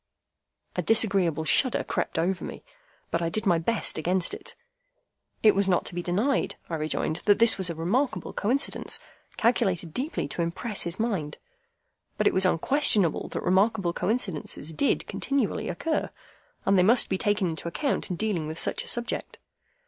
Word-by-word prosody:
A - - 0
disagreeable 195 -8 +2
shudder 255 - +3
crept - - -3
over 180 +2 0
me, - - -8 0.5
but 170 - 0
I 165 - 0
did 215 +6 -1
my 175 -4 +3
best 205 0 -1
against 180 +2 0
it. - - -9 0.9
It 215 -2 +7
was 195 0 +1
not 180 - +2
to - - -3
be 175 - -3
denied, 205 +11 0 0.2
I - - 0
rejoined, 155 0 -2
that 205 -1 +5
this 230 0 +7
was 185 -2 +2
a 170 - -4
remarkable 225 - -1
coincidence, 250 +7 0 0.4
calculated 190 -8 +1
deeply 270 - -3
to 170 - -3
impress 190 +6 -2
his 170 +3 -4
mind. 195 -10 -2 0.8
But - - 0
it - - +4
was 190 0 +3
unquestionable 200 - +3
that - - -5
remarkable 190 -1 +2
coincidences 180 - -2
did 280 - 0
continually 275 -6 -1
occur, 310 - -2 0.6
and 195 -1 +4
they - - +6
must 225 +6 +4
be 190 - -2
taken 205 -4 +1
into 160 +1 -6
account 275 - -2
in 180 - -2
dealing 180 -5 -2
with 160 +1 -6
such - - 0
a - - -13
subject. 240 0 -2
190 Hz, 170 wpm, -26 LUFS, 170-225 Hz, 0.9 s, It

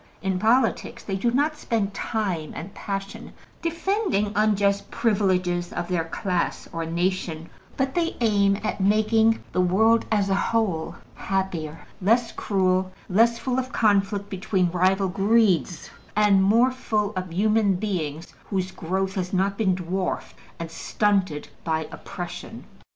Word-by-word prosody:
In 190 -1 0
politics, 230 +6 +1
they 195 - -3
do 215 +5 +1
not 290 +6 +1
spend 215 -7 -1
time 190 -8 -2
and 180 +5 -7
passion 195 -1 -6 0.3
defending 340 - 0
unjust 200 -1 +2
privileges 185 -5 +1
of 175 +1 -4
their 170 -3 0
class 180 +1 -2
or 165 -1 -3
nation, 170 -1 -2 0.3
but 265 0 0
they 335 -1 -1
aim 200 -4 +3
at 215 -2 -2
making 220 +3 +3
the 185 - +1
world 220 +6 +3
as 205 -2 +2
a 195 - +1 0.2
whole 200 -9 0 0.2
happier, 170 -5 -3 0.2
less 230 +4 +3
cruel, 185 -2 0 0.2
less 230 +5 +4
full 255 +1 -1
of 255 0 -4
conflict 200 -3 +2
between 185 -2 0
rival 190 +2 +2
greeds, 195 - +2 0.2
and 205 -2 +4
more 230 +6 +4
full 215 -5 -1
of 185 -2 -4
human 210 +2 +2
beings 170 -6 -3 0.2
whose 190 -2 -1
growth 190 +3 -2
has 185 -1 -3
not 195 +1 +1
been 195 -4 +1
dwarfed 185 +1 -3 0.2
and 165 -1 -6
stunted 190 -5 0 0.2
by 160 -1 -1
oppression. - - -7
195 Hz, 140 wpm, -24 LUFS, 180-220 Hz, 0.3 s, less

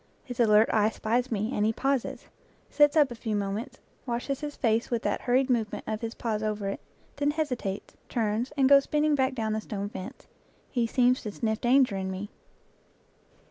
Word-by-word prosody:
His 245 -1 -8
alert 215 -1 +5
eye 215 -1 +4
spies 240 +3 -1
me, 215 +2 -1
and 210 - 0
he 220 - +3
pauses, 270 +2 -1 0.5
sits 295 +1 +4
up 290 -4 +5
a - - -3
few 225 -2 -3
moments, 205 +4 -3 0.3
washes 245 +3 -2
his 295 -1 -5
face 225 -1 +1
with 235 -2 -1
that - - -1
hurried 255 +2 +2
movement 230 -5 -1
of 215 0 -3
his 230 -1 -4
paws 220 -3 -2
over 210 -2 -2
it, 195 - -4 0.4
then 285 0 +1
hesitates, 255 -10 -3
turns, 225 +2 -1
and 270 -1 +4
goes 275 0 +6
spin 300 0 0
ning 305 0 +3
back 265 -2 +1
down 220 -3 -1
the 215 - -1
stone 205 -1 -4
fence. 215 +5 -8 0.5
He 240 -3 +1
seems 250 +1 +3
to 210 - -5
sniff 220 +1 -2
danger 250 -4 +4
in 190 0 -3
me. 190 +3 -5
230 Hz, 195 wpm, -28 LUFS, 215-260 Hz, 0.5 s, goes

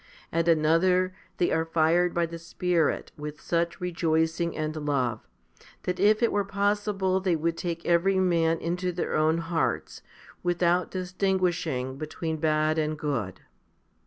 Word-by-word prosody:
At 165 0 +1
another 170 +3 +3 0.2
they 175 - +1
are 160 - +2
fired 165 +2 +2
by 170 0 +1
the 165 0 -7
Spirit 170 -1 0
with 150 0 -7
such 170 0 -1
rejoicing 165 -1 0
and 155 0 -2
love, 140 -7 -1 0.6
that 180 0 -2
if 215 +4 +4
it 235 - +3
were 205 - +1
possible 200 -1 0
they 185 -2 +1
would 165 +1 -1
take 170 -1 -4
every 175 +3 +3
man 165 -3 +2
into 180 +2 -2
their 175 0 -3
own 155 +1 +3
hearts, 165 0 -2 0.4
without 175 0 +1
distinguishing 180 -8 -1
between 160 +1 -4
bad 155 0 +1
and 155 0 -1
good. 120 -11 -3
170 Hz, 140 wpm, -27 LUFS, 155-180 Hz, 0.6 s, if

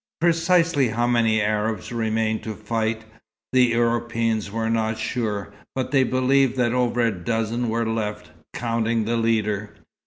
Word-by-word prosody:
Precisely 165 -3 +3
how 120 +2 0
many 115 -2 +2
Arabs 105 -1 -1
remained 110 -1 0
to 110 -1 -5
fight, 110 +1 -2 0.5
the 130 -1 +6
Europeans 115 -2 0
were 110 +2 -2
not 110 -1 0
sure, 105 -3 -3 0.2
but 130 -1 -2
they 135 -2 +4
believed 130 0 +2
that 120 -1 +2
over 125 -1 +1
a 115 -1 +3
dozen 115 +5 -2
were 115 +1 0
left, 110 -2 -3 0.2
counting 115 -1 -1
the 115 +2 0
leader. 105 -2 0
115 Hz, 145 wpm, -23 LUFS, 110-120 Hz, 0.5 s, the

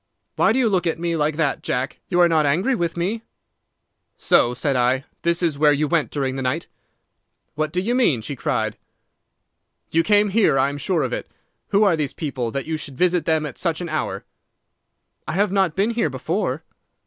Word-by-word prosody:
Why - - +3
do 230 - +1
you 255 -3 +3
look 185 -4 +1
at 165 - 0
me 170 0 -1
like 150 -1 0
that, 155 -3 0
Jack? 130 +1 -2
You 175 - +1
are 175 - +7
not 160 -2 +3
angry 185 - +2
with 170 -7 -2
me?' 200 +7 -1 1.0
"'So,' 120 +1 +3
said 135 +2 0
I, 125 +2 +2 0.2
'this 170 +2 +1
is 155 -4 0
where 150 -1 +5
you 150 +1 +1
went 165 -1 +1
during 135 -2 -2
the - - -3
night.' 130 0 -1 0.9
"'What 155 0 -2
do 180 - 0
you 220 +6 0
mean?' 160 - +2
she 140 - -5
cried. - - -2 1.1
"'You 165 - +3
came 205 +3 +3
here. 200 -8 +3
I 135 +1 +3
am 145 0 -6
sure 165 0 0
of 125 -2 -2
it. - - -4 0.4
Who 200 +2 +3
are 195 -5 +4
these 150 -3 -2
people, 135 -7 -3
that 135 +3 -4
you 160 0 -2
should 140 -3 -9
visit 180 -1 +2
them 160 -1 +1
at 150 - -7
such 165 -3 -1
an 175 -1 -5
hour?' 125 -11 -3 1.0
"'I - - -2
have 200 +2 +1
not 190 -5 +1
been 205 +4 +1
here 230 -9 0
before. 160 +2 -2
160 Hz, 205 wpm, -22 LUFS, 140-180 Hz, 1.1 s, are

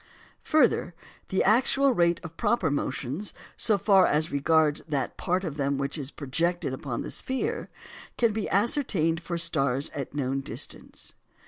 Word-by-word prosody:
Further, 255 - +2 0.3
the 190 - +1
actual 265 +5 +4
rate 170 -4 +2
of 165 -1 -9
proper 210 -7 +1
motions, 140 +6 -3 0.2
so 215 -3 +4
far 195 0 +5
as 155 +2 +1
regards 150 +1 +2
that 140 -3 -2
part 185 +1 -1
of 155 -5 -4
them 140 -1 0
which 140 0 -2
is 140 -4 -4
projected 165 +2 -1
upon 130 -2 -4
the - - -6
sphere, 260 0 -2 0.5
can 230 -3 +2
be 215 -1 -2
ascertained 190 - +1
for 170 0 -3
stars 140 -5 0
at 140 -1 -6
known 135 -1 -1
distance. - - -5
165 Hz, 150 wpm, -27 LUFS, 140-200 Hz, 0.5 s, far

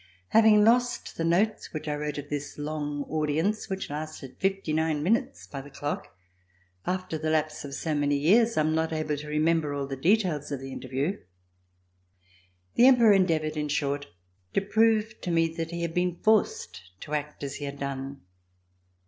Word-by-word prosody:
Having 215 -2 +6
lost 245 +2 +2
the 165 - -2
notes 185 +7 +1
which 155 -1 -5
I 150 - 0
wrote 150 0 -3
of 145 0 -6
this 145 0 -5
long 145 -1 -3
audience 160 +8 -1
which 190 -5 -4
lasted 150 -3 -6
fifty 195 -4 0
nine 155 -1 0
minutes 235 - 0
by 140 - -7
the 140 - -12
clock, 145 +1 -5 0.7
after 185 -3 -2
the 155 0 -1
lapse 155 -1 0
of 140 -1 -6
so 160 +2 -2
many 145 -1 +1
years 225 +11 +4
I - - +5
am 155 +1 +1
not 160 0 0
able 155 -1 -1
to 150 +1 -8
remember 150 -1 +1
all 140 -1 -2
the 135 0 -5
details 170 -1 +1
of 140 - -2
the 135 0 -8
interview. 135 +9 -3 1.5
The 245 - +6
Emperor 235 -5 +7
endeavored, 160 -5 +2
in 150 -1 -1
short, 145 -1 -1 0.5
to 195 - +3
prove 220 +2 +2
to - - -4
me 165 -1 +3
that 165 -1 -2
he 170 0 -4
had 170 -1 -2
been 180 0 0
forced 215 - +1 0.2
to 150 - -7
act 150 0 -3
as 140 0 -4
he 145 - -5
had 140 0 -6
done. 140 0 -5
155 Hz, 180 wpm, -27 LUFS, 145-190 Hz, 1.5 s, Emperor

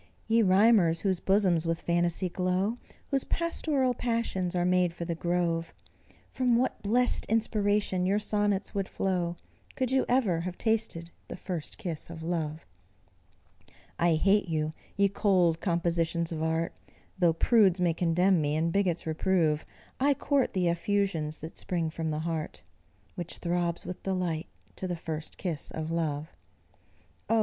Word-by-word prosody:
Ye 225 +1 +4
rhymers, 190 -4 +4
whose 190 -3 +1
bosoms 185 -5 +2
with 165 0 0
phantasy 175 +1 0
glow, 185 +5 0 0.3
Whose 275 -1 +1
pastoral 300 -6 0
passions 230 -8 -1
are 175 0 +1
made 180 -1 +2
for 170 - -5
the 170 - -2
grove, 170 -1 -1 0.6
From 250 -2 +2
what 255 +2 0
blest 245 +4 +1
inspiration 205 -4 +1
your 200 +2 +2
sonnets 205 -2 0
would 195 -2 -2
flow, 175 -3 -1 0.4
Could 260 -2 -1
you 265 0 +3
ever 230 -10 +2
have 180 +1 -5
tasted 215 -7 -1 0.2
the - - -6
first 175 -5 -5
kiss 170 -9 -5
of 165 -1 -8
love! 160 -2 -3 1.3
I 170 -1 +4
hate 195 +5 +3
you, 155 -1 -1 0.2
ye 200 0 +5
cold 185 -5 +2
compositions 170 -1 0
of 160 -1 -3
art; 160 +1 0 0.5
Though 170 -3 +4
prudes 195 0 +4
may 175 -2 +2
condemn 175 +2 +2
me, 145 0 0
and 165 +2 +1
bigots 185 -4 +1
reprove, 160 -1 +1 0.3
I 280 +2 +3
court 280 0 +1
the 180 -2 +1
effusions 170 -4 0
that 160 +2 -8
spring 170 -4 -2
from 160 0 -3
the 155 0 -2
heart 160 -1 -4 0.5
Which 175 -1 -3
throbs 175 -1 -1
with 180 - -6
delight 180 -4 -2 0.3
to 185 - -3
the 175 - -2
first 160 -1 -5
kiss 165 -6 -4
of 160 0 -4
love. 155 -2 -2 0.9
Oh! 225 - +4
180 Hz, 150 wpm, -29 LUFS, 165-200 Hz, 1.3 s, ye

